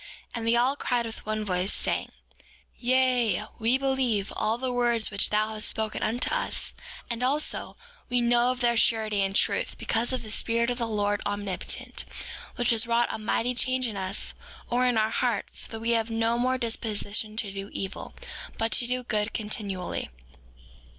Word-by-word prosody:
5:2 -, -, -13 dB, 0.3 s
And 230 Hz, -1 st, -3 dB
they 230 Hz, -, +4 dB
all 250 Hz, +4 st, +3 dB
cried 245 Hz, -4 st, 0 dB
with 225 Hz, -, -7 dB
one 215 Hz, 0 st, -1 dB
voice, 185 Hz, 0 st, +1 dB
saying: -, -, -1 dB, 0.7 s
Yea, 250 Hz, -5 st, +3 dB, 0.2 s
we 235 Hz, +3 st, +3 dB
believe 265 Hz, -7 st, +1 dB
all 220 Hz, +1 st, +1 dB
the 255 Hz, 0 st, -2 dB
words 235 Hz, -3 st, +2 dB
which 200 Hz, 0 st, +1 dB
thou 215 Hz, +1 st, +2 dB
hast 215 Hz, 0 st, +1 dB
spoken 220 Hz, -1 st, -1 dB
unto 235 Hz, +3 st, 0 dB
us; -, -, -2 dB, 0.3 s
and 235 Hz, 0 st, -3 dB
also, 280 Hz, +4 st, 0 dB, 0.3 s
we 245 Hz, 0 st, +3 dB
know 240 Hz, +1 st, +4 dB
of 255 Hz, 0 st, -2 dB
their 240 Hz, -1 st, +3 dB
surety 220 Hz, -2 st, +3 dB
and 195 Hz, 0 st, 0 dB
truth, -, -, +1 dB
because 230 Hz, +3 st, 0 dB
of 255 Hz, -, -2 dB
the 215 Hz, -, -7 dB
Spirit 235 Hz, +2 st, +2 dB
of 245 Hz, -, -3 dB
the 235 Hz, -, 0 dB
Lord 205 Hz, -2 st, 0 dB
Omnipotent, 205 Hz, -2 st, -3 dB, 0.5 s
which 245 Hz, -1 st, +2 dB
has 230 Hz, 0 st, +3 dB
wrought 235 Hz, 0 st, +2 dB
a -, -, -4 dB
mighty 230 Hz, +3 st, 0 dB
change 255 Hz, 0 st, +2 dB
in 220 Hz, -, -5 dB
us, 190 Hz, +1 st, +1 dB, 0.4 s
or 250 Hz, +1 st, +3 dB
in 245 Hz, -2 st, +2 dB
our 220 Hz, 0 st, +2 dB
hearts, 240 Hz, -5 st, -1 dB
that 225 Hz, -, -6 dB
we 230 Hz, +1 st, 0 dB
have 225 Hz, -1 st, +2 dB
no 225 Hz, +1 st, +1 dB
more 255 Hz, +1 st, +2 dB
disposition 215 Hz, -2 st, 0 dB
to 210 Hz, -3 st, -1 dB
do 195 Hz, 0 st, -5 dB
evil, 195 Hz, 0 st, -5 dB, 0.4 s
but 225 Hz, 0 st, 0 dB
to 240 Hz, -, +3 dB
do 250 Hz, 0 st, -1 dB
good 215 Hz, -2 st, 0 dB
continually. 205 Hz, -4 st, -3 dB
230 Hz, 185 wpm, -27 LUFS, 215-245 Hz, 0.7 s, they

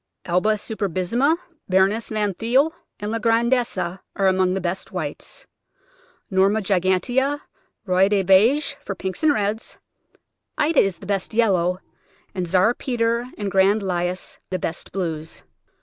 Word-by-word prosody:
Alba 180 Hz, +5 st, +2 dB
superbissima, 215 Hz, -, 0 dB, 0.3 s
Baroness 195 Hz, +4 st, +2 dB
Van 210 Hz, -2 st, -1 dB
Thuyl, 255 Hz, -, +2 dB, 0.3 s
and 210 Hz, +1 st, -4 dB
La 230 Hz, -, -1 dB
Grandesse 235 Hz, +1 st, +1 dB
are 185 Hz, +2 st, -2 dB
among 185 Hz, 0 st, +2 dB
the -, -, -1 dB
best 185 Hz, +2 st, -4 dB
whites; 160 Hz, -7 st, -6 dB, 0.9 s
Norma 195 Hz, +3 st, +3 dB
gigantea, 200 Hz, +9 st, +1 dB, 0.5 s
Roi 190 Hz, 0 st, +3 dB
des 200 Hz, -2 st, +2 dB
Beiges 220 Hz, +11 st, +4 dB
for 195 Hz, -, -6 dB
pinks 190 Hz, -1 st, -5 dB
and 310 Hz, -, +5 dB
reds; 215 Hz, -3 st, -2 dB, 0.8 s
Ida 310 Hz, +1 st, +3 dB
is 195 Hz, -3 st, +2 dB
the 195 Hz, -, -12 dB
best 200 Hz, +1 st, -2 dB
yellow; 185 Hz, -6 st, +2 dB, 0.5 s
and 185 Hz, -2 st, -3 dB
Czar 185 Hz, +6 st, +3 dB
Peter 235 Hz, -1 st, -1 dB
and 205 Hz, -2 st, -3 dB
Grand 195 Hz, +2 st, +3 dB
Lilas 180 Hz, -1 st, -3 dB
the 185 Hz, -, -1 dB
best 165 Hz, -2 st, -5 dB
blues. 165 Hz, -4 st, -4 dB
195 Hz, 135 wpm, -22 LUFS, 185-230 Hz, 0.9 s, and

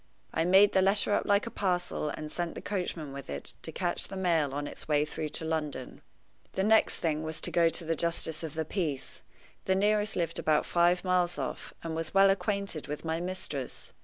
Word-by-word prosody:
I 165 Hz, -, +1 dB
made 195 Hz, +3 st, +6 dB
the 190 Hz, -, +4 dB
letter 200 Hz, +2 st, +3 dB
up -, -, +1 dB
like 200 Hz, 0 st, +3 dB
a 230 Hz, -, -5 dB
parcel, 180 Hz, -5 st, -1 dB
and 150 Hz, +1 st, -6 dB
sent 175 Hz, -1 st, -3 dB
the -, -, -6 dB
coachman 175 Hz, -7 st, -3 dB
with 140 Hz, -1 st, -8 dB
it 70 Hz, 0 st, -4 dB
to -, -, -5 dB
catch -, -, 0 dB
the 195 Hz, -, -7 dB
mail 165 Hz, -6 st, +2 dB
on 145 Hz, +1 st, -3 dB
its -, -, -5 dB
way 150 Hz, -1 st, +3 dB
through 155 Hz, 0 st, -4 dB
to 160 Hz, -, -4 dB
London. 150 Hz, -5 st, -3 dB, 0.5 s
The 190 Hz, -, 0 dB
next 220 Hz, +2 st, +4 dB
thing 155 Hz, -2 st, -1 dB
was 160 Hz, 0 st, -3 dB
to -, -, -1 dB
go 170 Hz, -1 st, +4 dB
to 165 Hz, +1 st, -2 dB
the 165 Hz, -, +1 dB
justice 165 Hz, -1 st, +2 dB
of 160 Hz, -2 st, -6 dB
the 160 Hz, 0 st, -1 dB
peace. 155 Hz, -6 st, -3 dB, 0.4 s
The 190 Hz, -, +2 dB
nearest 210 Hz, +1 st, +2 dB
lived 170 Hz, -2 st, -1 dB
about 155 Hz, -1 st, +2 dB
five 175 Hz, +1 st, +3 dB
miles 180 Hz, -1 st, +1 dB
off, -, -, -5 dB
and 165 Hz, -1 st, -3 dB
was 165 Hz, +2 st, -3 dB
well 195 Hz, 0 st, +7 dB
acquainted 200 Hz, -, -2 dB
with 150 Hz, +2 st, -5 dB
my 160 Hz, 0 st, -1 dB
mistress. 170 Hz, -7 st, -5 dB
170 Hz, 215 wpm, -30 LUFS, 155-190 Hz, 0.5 s, well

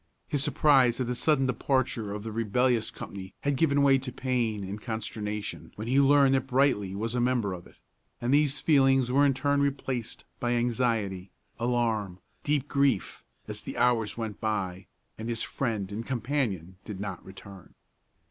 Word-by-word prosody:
His 145 Hz, -2 st, +1 dB
surprise 135 Hz, -5 st, +4 dB
at 130 Hz, -, 0 dB
the 125 Hz, -, -2 dB
sudden 135 Hz, +2 st, +2 dB
departure 125 Hz, -4 st, 0 dB
of 105 Hz, 0 st, -5 dB
the 110 Hz, -, -5 dB
rebellious 115 Hz, +2 st, +1 dB
company 95 Hz, -1 st, -9 dB
had 145 Hz, -1 st, 0 dB
given 140 Hz, -1 st, +3 dB
way 135 Hz, -1 st, +5 dB
to 130 Hz, 0 st, -5 dB
pain 120 Hz, -5 st, -1 dB
and 100 Hz, +3 st, -6 dB
consternation 105 Hz, -2 st, -5 dB
when 110 Hz, +2 st, -6 dB
he 135 Hz, +3 st, +4 dB
learned 140 Hz, -1 st, +5 dB
that 135 Hz, 0 st, +1 dB
Brightly 125 Hz, -8 st, +2 dB
was 115 Hz, +3 st, -3 dB
a 125 Hz, -, 0 dB
member 120 Hz, -6 st, +1 dB
of 90 Hz, -1 st, -9 dB
it; -, -, -20 dB, 0.4 s
and 120 Hz, +3 st, 0 dB
these 145 Hz, -1 st, +3 dB
feelings 135 Hz, -4 st, +3 dB
were 140 Hz, +2 st, +5 dB
in 135 Hz, -, +1 dB
turn 140 Hz, +2 st, +1 dB
replaced 135 Hz, -4 st, -2 dB, 0.2 s
by 120 Hz, 0 st, 0 dB
anxiety, 115 Hz, -6 st, 0 dB, 0.3 s
alarm, 115 Hz, -6 st, 0 dB, 0.3 s
deep 145 Hz, -1 st, 0 dB
grief, 140 Hz, -8 st, 0 dB, 0.2 s
as -, -, -6 dB
the -, -, -7 dB
hours 120 Hz, -4 st, +2 dB
went 110 Hz, -3 st, -4 dB
by, 95 Hz, -4 st, -2 dB, 0.3 s
and 110 Hz, +1 st, -4 dB
his 115 Hz, -1 st, 0 dB
friend 110 Hz, -7 st, -2 dB
and 110 Hz, +3 st, -4 dB
companion 115 Hz, -, -2 dB
did 105 Hz, -4 st, -7 dB
not 95 Hz, -2 st, -5 dB
return. 95 Hz, -1 st, -13 dB
120 Hz, 170 wpm, -28 LUFS, 105-135 Hz, 0.4 s, way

